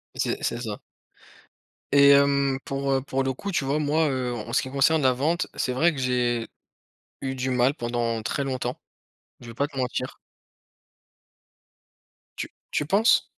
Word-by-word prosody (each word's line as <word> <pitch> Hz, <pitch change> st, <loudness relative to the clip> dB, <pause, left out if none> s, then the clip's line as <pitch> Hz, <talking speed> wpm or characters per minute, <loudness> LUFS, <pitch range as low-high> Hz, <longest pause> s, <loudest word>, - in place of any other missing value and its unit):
C'est -, -, -1 dB
c'est 115 Hz, -, -1 dB
ça. 110 Hz, -4 st, -5 dB, 1.1 s
Et 140 Hz, 0 st, +8 dB
hem, 140 Hz, -1 st, +4 dB
pour, 135 Hz, 0 st, -3 dB
heu, 135 Hz, -, +1 dB
pour 135 Hz, 0 st, -2 dB
le 130 Hz, -, -1 dB
coup, 200 Hz, +10 st, -5 dB
tu 145 Hz, -6 st, 0 dB
vois, 140 Hz, +2 st, +1 dB
moi, 155 Hz, +1 st, +2 dB
heu, 130 Hz, -2 st, -2 dB
en 115 Hz, 0 st, -6 dB
ce -, -, +3 dB
qui 130 Hz, -, -6 dB
concerne 145 Hz, +3 st, +3 dB
la 130 Hz, -, +4 dB
vente, 155 Hz, +8 st, 0 dB
c'est 125 Hz, -, -1 dB
vrai 165 Hz, +7 st, +3 dB
que 135 Hz, -, -6 dB
j'ai 120 Hz, -2 st, 0 dB, 0.7 s
eu 135 Hz, -1 st, -3 dB
du 130 Hz, +1 st, -2 dB
mal 125 Hz, +2 st, +3 dB
pendant 120 Hz, -3 st, -2 dB
très 140 Hz, +4 st, -2 dB
longtemps, 130 Hz, -2 st, -3 dB, 0.6 s
je 120 Hz, -, -12 dB
vais 115 Hz, -, -9 dB
pas 140 Hz, +4 st, 0 dB
te 145 Hz, -, -17 dB
mentir. 130 Hz, 0 st, -3 dB, 2.2 s
Tu -, -, -4 dB, 0.2 s
tu 150 Hz, -, 0 dB
penses? 205 Hz, +8 st, +4 dB
135 Hz, 170 wpm, -25 LUFS, 125-140 Hz, 2.2 s, Et